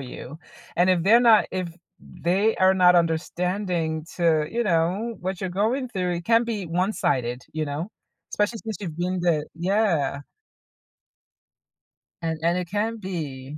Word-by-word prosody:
you, 135 +3 -9 0.4
and 180 +2 +4
if 175 -2 +2
they're 225 +6 +6
not 230 -3 +6
if 185 -2 -3 0.3
they 195 +6 0
are 190 0 +4
not 180 -1 +5
understanding 170 -1 -1
to, 160 -3 +2
you 235 +1 -1
know, 190 +6 0
what 185 +1 -4
you're 190 - -3
going 230 +8 0
through, 180 -5 -2
it 170 0 -5
can 230 0 +4
be 215 -6 -3
one-sided, 165 - -1
you 155 0 -2
know, 150 +6 -4 0.4
especially 210 +2 0
since 220 -4 -4
you've 165 -5 -6
been 180 +1 -1
the 160 -4 +1
yeah. 170 -6 0 2.0
An 160 -1 -2
and 170 +2 +1
it 180 - -2
can 215 +4 -2
be 150 -8 -6
180 Hz, 150 wpm, -24 LUFS, 160-205 Hz, 2.0 s, they're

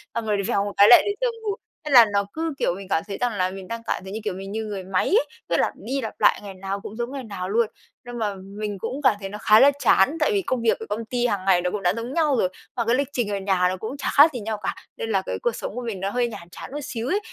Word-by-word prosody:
xong 230 - -2
rồi 210 -1 +1
lại 200 - -1
vèo 200 - +1
một 205 - -4
cái 200 - +8
lại 240 - +10
đến 410 0 -1
giờ - - +3 0.2
ngủ. 410 -2 -1 0.3
Thế 300 - -4
là 245 -4 +9
nó 200 0 +2
cứ, 325 0 -2
kiểu, 175 - +1
mình 195 0 -9
cảm 160 - +1
thấy 200 - -5
rằng 245 -2 0
là 185 -2 0
mình 190 -1 -8
đang 230 +2 -5
cảm - - -1
thấy 190 - -8
như, 220 - -3
kiểu, 210 -3 -2
mình 195 +1 -7
như 220 +1 -3
người 200 -3 -5
máy 185 0 0
ấy, 440 +6 +3 0.2
cứ - - +2
lặp - - +1
đi 270 +3 -3
lặp 225 - -5
lại - - +4
ngày 200 -1 -7
nào 195 +1 -4
cũng 205 - -8
giống 240 +2 -3
ngày 275 -1 -5
nào 195 -5 -5
luôn. 225 +2 +2 0.4
Nhưng 245 0 -7
mà 210 -3 -1
mình 200 +2 -6
cũng 250 +8 -4
cảm 260 -5 +5
thấy 195 -1 -6
nó 205 - -6
khá 215 +1 +5
là 280 - +8
chán 280 +4 +4
tại 300 - +2
vì 400 - +2
công 255 -9 -2
việc 230 - +2
ở 225 - -6
công 220 +2 -3
ty 245 +1 0
hàng 200 -5 -2
ngày 185 -2 +4
nó 180 0 -1
cũng 210 - -3
đã 180 0 +3
giống 235 +3 -4
nhau 300 -5 +2
rồi 185 - +2 0.3
và 235 - -1
cái 235 +2 +3
lịch 280 +1 0
trình 240 -4 -1
ở 200 - -1
nhà 190 -2 +2
nó 185 - -3
cũng 220 +8 -6
chả - - -2
khác 295 +3 +7
gì 250 - -4
nhau 220 0 -3
cả, - - -2 0.2
nên 225 - -4
là 195 -3 +2
cái - - -3
cuộc 480 - +1
sống - - -6
của 250 - -3
mình 230 -5 -4
nó 195 +1 -1
hơi 245 +3 0
nhàm 175 -7 -9
chán - - -9
một 290 - -4
xíu 240 -4 -4
ấy. 390 +8 +1
220 Hz, 330 wpm, -24 LUFS, 195-250 Hz, 0.4 s, lại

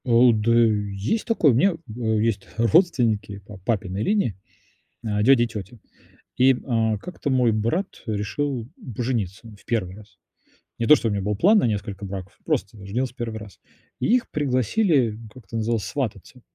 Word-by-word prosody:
А, - - -5
у, 120 +1 +7
да 110 +1 +1
есть 105 - +1
такой, 200 - +3
у - - +2
меня, 175 - +3 0.2
а, - - -6 0.2
есть 110 -3 -1
родственники 115 - +2
по 105 -1 -11
папиной 100 0 -2
линии, 200 - +1 0.7
а, 105 -2 0
дядя 120 +1 +5
и - - -1
тётя, 110 0 -8 0.6
и, 130 +1 +6
м, 125 - -7
а, 110 -3 +1
как-то 160 - -5
мой 125 -3 +3
брат 115 - 0 0.2
решил 115 +4 -2 0.3
пожениться 115 -4 -3
в - - -23
1 95 -6 -2
раз. 105 -1 -16 0.6
Не 115 - -1
то, 150 - +9
что 120 - -1
у - - 0
меня 100 -1 -1
был 105 +2 -1
план 200 - +5
на - - +2
несколько 100 -2 -3
браков, 95 -1 -7
просто 100 +2 -2
женился 125 +6 -2
в - - -42
1 115 -2 -4
раз. 105 -4 -12 0.4
И - - 0
их 250 - -1
пригласили, 130 - +1 0.2
как 125 -5 -14
это 115 - -6
называлось, 115 -1 0
свататься, 125 0 -5
115 Hz, 180 wpm, -23 LUFS, 105-130 Hz, 0.7 s, то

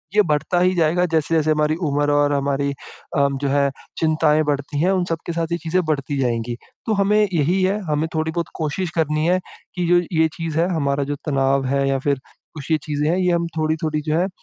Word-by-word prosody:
ये 210 - +7
बढ़ता 155 +3 +1
ही 185 +1 +3
जाएगा 170 +1 +2
जैसे-जैसे 160 -1 +1
हमारी 155 0 +2
उम्र 145 +1 +1
और 145 0 +3
हमारी 140 0 0
अ, 140 0 -3
जो 140 +1 -2
है 140 0 +2 0.3
चिंताएँ 155 -1 +3
बढ़ती 145 0 -2
हैं 180 +3 +3
उन 185 -2 +1
सब 165 - 0
के - - -1
साथ, 165 0 -1
चीज़ें 170 +1 0
बढ़ती 145 -2 -1
जाएँगी। 120 -2 -1 0.3
तो 220 - +2
हमें 205 +1 +3
यही 170 +4 +2
है 195 +3 +1
हमें 150 +2 +1
थोड़ी 160 0 0
बहुत 170 +1 -2
कोशिश 160 +4 -2
करनी 155 -1 +1
है 180 +1 +3 0.4
कि 180 -1 -1
जो 175 0 +5 0.2
ये 160 - +5
चीज़ 165 -2 -3
है 170 - +3
हमारा 140 -2 0
जो - - -1
तनाव 135 -1 +1
है 140 +1 +1
या 135 -1 +1
फ़िर 140 0 0 0.3
कुछ 150 0 -7
ये 160 - +4
चीज़ें 150 0 -1
हैं 175 - +2
ये 180 -1 +2
हम 170 0 0
थोड़ी-थोड़ी 155 -1 0
जो 155 +1 -1
है 180 - +2
अ, - - -4
155 Hz, 220 wpm, -21 LUFS, 145-170 Hz, 0.4 s, ये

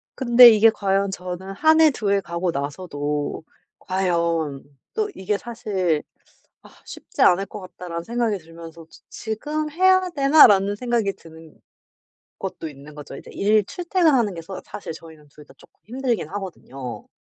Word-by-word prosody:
근데 245 -1 +8
이게 225 0 +6
과연 195 -2 0
저는 185 0 -6
1 315 +9 +4
해, 315 -1 +6
2 215 -6 -3
해 200 0 +2
가고 170 0 -3
나서도 145 0 -4 0.4
과연 170 -6 -1 0.3
또 430 -1 -1
이게 200 +2 -2
사실 200 -9 -2 0.6
'아 - - -16 0.2
쉽지 - - -7
않을 185 +2 +5
것 210 - -9
같다.'라는 175 -2 -7
생각이 230 0 -1
들면서 165 0 -12
'지 - - -18
지금 300 +8 -4
해야 375 +2 +3
되나?'라는 275 - +5
생각이 235 -3 -1
드는 160 -2 -16 0.8
것도 160 - -6
있는 145 +1 -14
거죠. 145 -2 -10
이제 - - -12
일 210 +1 +2
출퇴근하는 315 - +1
게 165 - -7
서 185 +3 -8
사실 180 - -7
저희는 160 -2 -14
2 150 +1 -16
다 - - -18
쪼끔 - - -22
힘들긴 245 - -2
하거든요. 170 -10 -8
195 Hz, 290 characters per minute, -22 LUFS, 165-235 Hz, 0.8 s, 근데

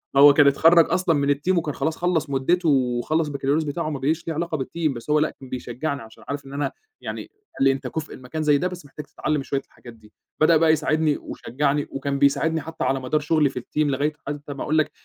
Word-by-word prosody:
هو 140 +1 +9
كان 145 -1 +5
اتخرّج 165 +4 +6
أصلًا 180 -3 +2
من 140 0 +2
الteam 180 +6 0
وكان 150 -3 -1
خلاص 160 0 -1
خلّص 170 -4 0
مدته 160 +5 +1
وخلّص 135 +4 +1
البكالوريوس 140 +2 0
بتاعه 155 +2 -3
وما 145 -3 -3
بقاش 160 +5 -1
ليه 165 - -1
علاقة 165 0 -2
بالteam، 155 +2 -2
بس 120 +5 -9
هو 150 0 +4
لأ 155 - +2
كان 130 -2 -11
بيشجعني 130 +3 -4
عشان 110 0 -14
عارف 140 -1 -4
إن 135 - -10
أنا 145 +1 -1 0.3
يعني - - -5 0.4
قال - - +2
لي: 135 - +6
"أنت 135 -1 -4
كُفء 155 +4 -5
لمكان 130 +5 -5
زي 145 -1 +4
ده 180 - 0
بس 180 -4 -8
محتاج 145 +1 -9
تتعلّم 150 -1 -2
شوية 140 0 -2
الحاجات 120 -1 -14
دي."، 110 -1 -20 0.3
بدأ 160 +1 +6
بقى 160 0 +4
يساعدني 155 -1 +1
وشجعني 145 +3 -2
وكان 140 0 -2
بيساعدني 160 +3 +2
حتّى 160 +2 -6
على 135 0 +1
مدار 130 +4 0
شغلي 150 -1 +2
في 125 - -5
الteam 125 - -14
لغاية 145 +2 0
حتى 145 0 -5
ما 140 - -5
أقول 155 +1 0
لك 155 - +2
145 Hz, 230 wpm, -23 LUFS, 135-160 Hz, 0.4 s, هو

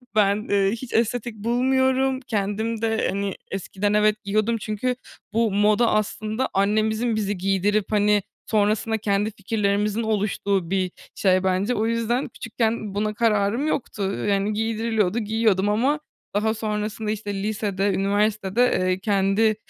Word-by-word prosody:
Ben, 205 +1 +2
eee, 195 -1 +3
hiç 235 +2 -6
estetik 235 0 0
bulmuyorum, 260 +3 +1
kendim 220 -1 -2
de, 225 -1 +1
hani, 200 0 -2 0.2
eskiden 195 +2 -2
evet, 210 0 +2
giyiyordum 215 +3 +1
çünkü 215 +4 -2 0.4
bu 225 -2 +2
moda 210 +3 +3
aslında 215 +3 -1
annemizin 215 +3 +1
bizi 205 -2 -1
giydirip, 195 +2 0
hani, 210 -1 +3 0.2
sonrasında 215 +1 +1
kendi 205 +1 0
fikirlerimizin 205 +1 0
oluştuğu 200 -4 0
bir 185 -2 0 0.2
şey 185 -1 +2
bence. 190 +6 +1
O 220 - 0
yüzden 230 +3 0
küçükken 225 -3 -2
buna 210 +1 0
kararım 220 +5 +1
yoktu, 230 -8 -2 0.2
yan, 200 +1 +1
giydiriliyordu, 225 -1 0
giyiyordum 215 -2 +1
ama 265 +8 +2 0.4
daha 220 +1 +2
sonrasında, 215 0 -3
işte, 205 -1 -4
lisede 200 -1 -1
üniversitede, 205 +2 +1 0.2
eee, 185 0 +1
kendi 205 +2 +2
215 Hz, 130 wpm, -23 LUFS, 200-225 Hz, 0.4 s, eee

